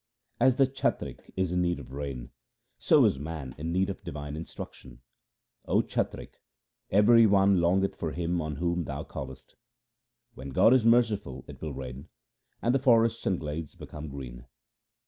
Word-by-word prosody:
As 130 +1 +5
the 135 - +5
chatrik 135 +1 -3
is 95 -2 0
in 90 0 +1
need 85 -2 0
of 65 -3 -11
rain, 70 -3 -5 0.5
so - - +5
is 65 - +2
man 75 -3 -6
in 80 +2 -3
need 95 +2 +1
of 100 - -6
divine 75 0 -6
instruction: 65 -5 -9 0.3
— - - -47
O - - +3
chatrik, - - -4 0.5
every 110 +3 +6
one 100 -2 +4
longeth 95 +3 +2
for 80 - -3
Him 85 +1 -1
on 75 -2 -4
whom 85 +2 -1
thou 70 +1 -5
callest. 65 -1 -9 0.8
When 65 +2 -8
God 90 - +5
is 130 -3 +4
merciful 115 - +2
it - - -11
will 75 -4 -5
rain, 65 0 -8 0.5
and 120 - +3
the 135 - +3
forests 115 -3 +3
and 95 -3 +1
glades 75 0 -5
become 75 +1 -8
green. 65 -3 -8
85 Hz, 165 wpm, -28 LUFS, 70-100 Hz, 0.8 s, every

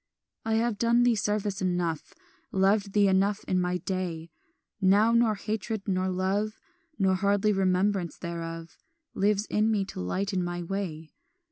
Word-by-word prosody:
"I 225 0 0
have 225 -2 0
done 235 +1 +3
thee 245 -1 +4
service 205 -2 -1
enough, 175 -4 -2 0.4
Loved 195 +1 +2
thee 205 -1 +4
enough 195 +2 +2
in 185 -1 +1
my 180 0 0
day; 175 -4 -4 0.5
Now 200 +4 +4
nor 235 -2 +3
hatred 215 0 -4
nor 185 -1 0
love 195 +4 -1 0.4
Nor 190 -2 +2
hardly 200 +2 +2
remembrance 190 -1 +1
thereof 165 -1 -6 0.3
Lives 205 +1 +1
in 215 0 +1
me 205 -3 +1
to - - -8
lighten 185 - -1
my 175 0 -3
way. 165 -4 -5
195 Hz, 145 wpm, -28 LUFS, 180-210 Hz, 0.5 s, thee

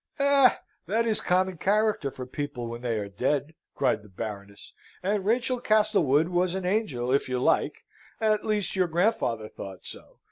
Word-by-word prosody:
"Eh! 280 -3 +5 0.3
That 225 +5 +1
is 220 -2 +1
a - - -10
common 185 0 +1
character 210 -6 +1
for 130 -1 -8
people 140 -2 -5
when 115 +1 -6
they 120 -3 -1
are 105 -1 -3
dead!" 140 +9 -1 0.2
cried 105 - +1
the 105 - -16
Baroness; 100 +1 -8 0.3
"and 200 +1 0
Rachel 245 +2 +1
Castlewood 205 - +3
was 180 0 +1
an 190 -1 -3
angel, 170 - 0
if 140 -1 +1
you 130 - 0
like 125 - +1 0.4
at 215 -1 +2
least 210 -2 -1
your 185 -1 +2
grandfather 160 - 0
thought 95 -3 -10
so. - - -10
175 Hz, 175 wpm, -27 LUFS, -, 0.4 s, Eh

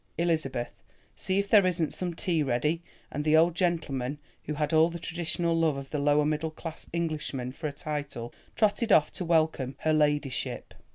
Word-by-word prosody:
Elizabeth, 155 -8 0 0.4
see 190 - -1
if 200 0 0
there 205 -1 +7
isn't 175 -4 0
some 175 -2 -3
tea 170 -3 0
ready," 150 +5 0 0.3
and 150 - -3
the 155 +1 +4
old 165 +2 +5
gentleman, 150 -7 -1 0.3
who 150 - -3
had 150 +2 -1
all 160 +1 +5
the 170 - -6
traditional 170 0 -2
love 160 -3 +2
of 135 0 -8
the 150 - -1
lower 145 +1 +3
middle 155 +1 0
class 160 +1 -8
Englishman 155 -6 -2
for 155 +4 -5
a - - -3
title, 145 -5 -5 0.2
trotted 215 +1 +2
off 155 -5 +5
to - - -5
welcome 155 -6 +1
"her 155 - +2
ladyship." 145 -3 0
155 Hz, 180 wpm, -28 LUFS, 145-170 Hz, 0.4 s, there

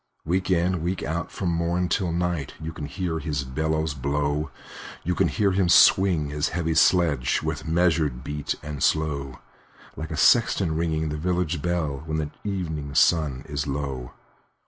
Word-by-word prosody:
Week 90 +3 0
in, 90 -1 +1
week 90 +2 -2
out, 80 +2 -3
from 95 - -2
morn 85 +1 0
till 90 0 0
night, 85 -4 -2
You 80 +1 -6
can 75 -2 -6
hear 80 +2 -3
his 75 -3 -2
bellows 80 +3 -1
blow; 75 +2 -1 0.5
You 90 - 0
can - - +2
hear 100 -3 +1
him 95 -2 +1
swing 85 -4 +5
his 75 +1 0
heavy 80 -1 -1
sledge, 80 -7 +3
With - - -3
measured 80 -6 +1
beat 75 0 -3
and 75 -2 -6
slow, 70 -5 0 0.6
Like 80 0 -6
a 80 - -4
sexton 95 -2 +4
ringing 80 -1 -1
the 75 - -3
village 90 -1 -1
bell, 80 -5 -1
When 80 0 -1
the 75 -1 -2
evening 80 -8 -4
sun 75 -7 +3
is 70 0 -3
low. 70 -3 -4
80 Hz, 165 wpm, -25 LUFS, 75-85 Hz, 0.6 s, swing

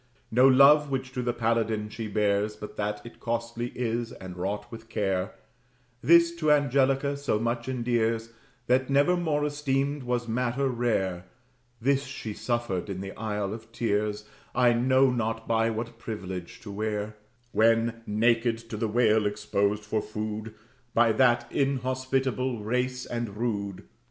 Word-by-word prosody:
No 125 +4 +6
love 140 +3 +7
which 130 -1 -3
to 125 - -3
the 120 0 0
paladin 115 -2 0
she 110 +1 -6
bears, 105 0 +1
But 105 0 -9
that 105 0 -3
it 115 - -11
costly 115 +1 -3
is 120 -1 -2
and 95 -1 -9
wrought 95 +3 -4
with 115 -1 -10
care, 95 -2 -1 0.7
This 170 +1 +5
to 155 -2 +2
Angelica 140 -1 +3
so 140 -6 0
much 115 +2 -2
endears, 115 -2 0 0.3
That 130 +2 +2
never 140 +6 +4
more 155 -4 0
esteemed 145 -1 -1
was 125 -1 -2
matter 125 +3 0
rare; 95 -7 -1 0.5
This 135 +3 +2
she 130 -4 -6
was - - -10
suffered, 120 -6 -1
in 95 -1 -4
the 95 0 -5
isle 105 -2 -2
of 115 0 -10
tears, 105 -2 -1 0.3
I 120 -1 +5
know 130 +2 +4
not 115 -2 -2
by 115 0 +2
what 115 +1 -5
privilege, 95 -3 -6
to 110 -4 -8
wear, 105 +1 -3 0.4
When, 115 +1 +2
naked, 115 +2 +2
to 110 - -3
the 110 +1 0
whale 110 -1 +3
exposed 105 0 -1
for 110 - 0
food 110 +1 -5 0.4
By 115 0 +5
that 120 +1 +3
inhospitable 130 -2 0
race 125 +3 -1
and 120 -4 -4
rude. 100 -4 -2
115 Hz, 150 wpm, -27 LUFS, 105-130 Hz, 0.7 s, love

